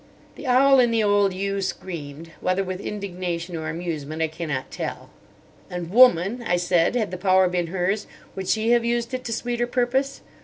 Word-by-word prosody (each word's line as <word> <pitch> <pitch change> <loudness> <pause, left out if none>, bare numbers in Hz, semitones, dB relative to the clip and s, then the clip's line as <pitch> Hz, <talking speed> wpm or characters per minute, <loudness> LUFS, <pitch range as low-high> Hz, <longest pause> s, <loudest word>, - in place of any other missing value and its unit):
The 285 - -9
owl 265 +2 +5
in 245 -1 +5
the 225 -1 +1
old 205 -1 +3
yew 195 +1 -2
screamed, 165 -4 -6
whether 185 +1 +1
with 185 -1 -5
indignation 180 -4 -4
or 160 -1 -4
amusement 160 -2 -4
I 160 - 0
cannot 155 -5 -4
tell. - - -6 0.6
"And 175 -1 -5
woman," 235 -1 +5
I 175 -6 +1
said, 175 +3 +2
"had 220 -6 0
the 185 - -5
power 185 0 +4
been 175 -1 -1
hers, 190 +4 -1 0.3
would 190 -1 -5
she 220 +3 +1
have 240 -1 +4
used 235 +1 -1
it 255 0 -3
to 230 - -4
sweeter 240 +1 -1
purpose? 260 +3 0
190 Hz, 185 wpm, -24 LUFS, 175-235 Hz, 0.6 s, owl